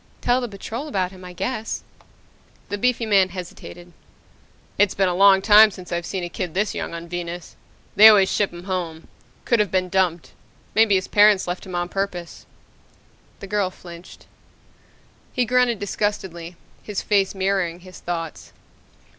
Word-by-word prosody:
Tell 245 Hz, +1 st, +1 dB
the 245 Hz, -, -3 dB
Patrol 225 Hz, +7 st, -7 dB
about 190 Hz, -9 st, -1 dB
him, 185 Hz, -1 st, -13 dB
I 180 Hz, -, -9 dB
guess." 225 Hz, +4 st, -4 dB, 0.9 s
The 205 Hz, -, -3 dB
beefy 245 Hz, 0 st, +1 dB
man 195 Hz, -3 st, +3 dB
hesitated. 175 Hz, -1 st, -10 dB, 0.9 s
"It's 205 Hz, -2 st, +3 dB
been 190 Hz, -1 st, +2 dB
a 180 Hz, -, 0 dB
long 195 Hz, +1 st, +5 dB
time 215 Hz, +1 st, +8 dB
since 185 Hz, -3 st, -12 dB
I've 170 Hz, -1 st, -3 dB
seen 190 Hz, -2 st, -4 dB
a -, -, -3 dB
kid 175 Hz, -1 st, -5 dB
this 205 Hz, +1 st, 0 dB
young -, -, -5 dB
on 170 Hz, 0 st, -8 dB
Venus. 175 Hz, 0 st, -6 dB, 0.4 s
They 215 Hz, +2 st, +10 dB
always 200 Hz, -3 st, +5 dB
ship 205 Hz, -, 0 dB
'em 175 Hz, 0 st, -10 dB
home. 175 Hz, -4 st, -5 dB, 0.4 s
Could 235 Hz, -, +2 dB
have 210 Hz, -2 st, +2 dB
been 185 Hz, 0 st, 0 dB
dumped. 180 Hz, -3 st, 0 dB, 0.4 s
Maybe 220 Hz, -2 st, +4 dB
his 185 Hz, -, -1 dB
parents 205 Hz, -2 st, +4 dB
left 175 Hz, +2 st, -5 dB
him 185 Hz, -, -6 dB
on 175 Hz, 0 st, -1 dB
purpose." 180 Hz, -3 st, -5 dB, 0.9 s
The -, -, -6 dB
girl 200 Hz, -2 st, 0 dB
flinched. 175 Hz, -1 st, -13 dB, 1.1 s
He 250 Hz, -2 st, +1 dB
grunted 250 Hz, -1 st, +2 dB
disgustedly, 190 Hz, -4 st, -3 dB, 0.3 s
his 210 Hz, -2 st, -5 dB
face 200 Hz, -2 st, +1 dB
mirroring 190 Hz, -3 st, -1 dB
his 185 Hz, 0 st, -13 dB
thoughts. 165 Hz, -2 st, -6 dB
190 Hz, 165 wpm, -22 LUFS, 175-205 Hz, 1.1 s, They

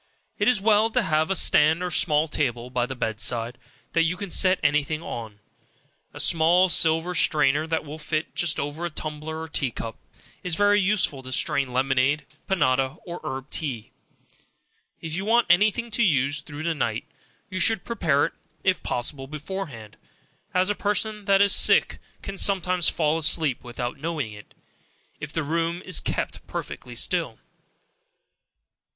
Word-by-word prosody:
It -, -, +1 dB
is 250 Hz, -4 st, +4 dB
well 215 Hz, +2 st, +3 dB
to 245 Hz, +1 st, 0 dB
have 155 Hz, -2 st, 0 dB
a 195 Hz, -, 0 dB
stand 160 Hz, 0 st, +4 dB
or 180 Hz, -, -2 dB
small 155 Hz, -2 st, +3 dB
table 125 Hz, -5 st, -2 dB
by 125 Hz, -1 st, -1 dB
the 135 Hz, -, -6 dB
bed 110 Hz, -3 st, -3 dB
side, 120 Hz, +1 st, 0 dB, 0.3 s
that 165 Hz, -, +3 dB
you 165 Hz, +2 st, 0 dB
can 200 Hz, -1 st, -6 dB
set 185 Hz, -1 st, +4 dB
any 150 Hz, 0 st, +3 dB
thing 155 Hz, +3 st, -5 dB
on. 110 Hz, -7 st, -7 dB, 0.7 s
A -, -, -11 dB
small 175 Hz, +3 st, +4 dB
silver 165 Hz, +1 st, +3 dB
strainer 155 Hz, -2 st, +3 dB
that 160 Hz, -1 st, -2 dB
will 150 Hz, +2 st, -8 dB, 0.3 s
just 175 Hz, -4 st, +1 dB
fit -, -, -4 dB
over 145 Hz, +4 st, -4 dB
a 175 Hz, -, -1 dB
tumbler 155 Hz, 0 st, -5 dB
or 160 Hz, -, -6 dB
tea 145 Hz, -3 st, -2 dB
cup, 115 Hz, -1 st, -7 dB, 0.4 s
is 180 Hz, -3 st, -1 dB
very 205 Hz, +2 st, +3 dB
useful 185 Hz, -8 st, +1 dB
to 130 Hz, 0 st, -9 dB
strain 130 Hz, +1 st, +1 dB
lemonade, 135 Hz, +3 st, +1 dB, 0.2 s
panada 135 Hz, -6 st, +1 dB
or 175 Hz, -1 st, -7 dB
herb 135 Hz, -2 st, -6 dB
tea. 130 Hz, -9 st, -3 dB, 1.1 s
If 160 Hz, -1 st, -6 dB
you 190 Hz, +4 st, -2 dB
want 230 Hz, +3 st, +3 dB
any 210 Hz, +4 st, +5 dB
thing 235 Hz, +2 st, -6 dB
to 220 Hz, -, -1 dB
use 145 Hz, -, +1 dB
through 145 Hz, +1 st, -9 dB
the 165 Hz, 0 st, 0 dB
night, 115 Hz, -6 st, -2 dB, 0.5 s
you 185 Hz, -, -3 dB
should 215 Hz, +1 st, +3 dB
prepare 155 Hz, -11 st, +1 dB
it, -, -, -5 dB, 0.3 s
if 185 Hz, -1 st, +1 dB
possible, 135 Hz, +2 st, -4 dB
beforehand; 150 Hz, -, -7 dB, 0.5 s
as 185 Hz, +2 st, +2 dB
a -, -, +1 dB
person 210 Hz, +1 st, -2 dB
that 195 Hz, -1 st, +4 dB
is 200 Hz, -, +4 dB
sick, -, -, +5 dB, 0.2 s
can 195 Hz, -1 st, -4 dB
sometimes 185 Hz, -3 st, +3 dB
fall 155 Hz, 0 st, 0 dB
asleep 155 Hz, -4 st, +2 dB
without 120 Hz, +1 st, -5 dB
knowing 150 Hz, -8 st, -4 dB
it, 105 Hz, 0 st, -14 dB, 0.6 s
if 155 Hz, -1 st, -7 dB
the 160 Hz, 0 st, -2 dB
room 165 Hz, +3 st, -1 dB
is -, -, +2 dB
_kept -, -, -3 dB
perfectly -, -, -7 dB
still. -, -, -1 dB
160 Hz, 170 wpm, -24 LUFS, 135-185 Hz, 1.1 s, any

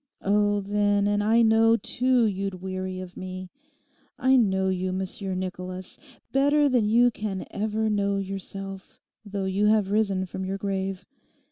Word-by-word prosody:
Oh, 205 Hz, 0 st, +2 dB
then, 205 Hz, 0 st, +1 dB
and 205 Hz, 0 st, +1 dB
I 225 Hz, +2 st, +4 dB
know, 225 Hz, +1 st, +5 dB
too, 250 Hz, 0 st, +2 dB
you'd 195 Hz, -2 st, -2 dB
weary 185 Hz, 0 st, -4 dB
of 185 Hz, -1 st, -9 dB
me. 185 Hz, 0 st, -7 dB, 0.7 s
I 260 Hz, +1 st, +3 dB
know 190 Hz, -6 st, +2 dB
you, 185 Hz, 0 st, -1 dB
Monsieur 190 Hz, +1 st, -3 dB
Nicholas, 185 Hz, 0 st, -5 dB, 0.3 s
better 285 Hz, +2 st, +3 dB
than 245 Hz, -6 st, +2 dB
you 240 Hz, +2 st, +5 dB
can 210 Hz, -4 st, -4 dB
ever 215 Hz, +1 st, -1 dB
know 200 Hz, -1 st, +1 dB
yourself, 195 Hz, 0 st, -6 dB, 0.2 s
though 200 Hz, -2 st, -4 dB
you 195 Hz, +2 st, +1 dB
have 210 Hz, -2 st, +3 dB
risen 200 Hz, -3 st, +1 dB
from 190 Hz, +1 st, -6 dB
your 190 Hz, +1 st, -3 dB
grave. 195 Hz, -1 st, -3 dB
200 Hz, 150 wpm, -26 LUFS, 190-215 Hz, 0.7 s, know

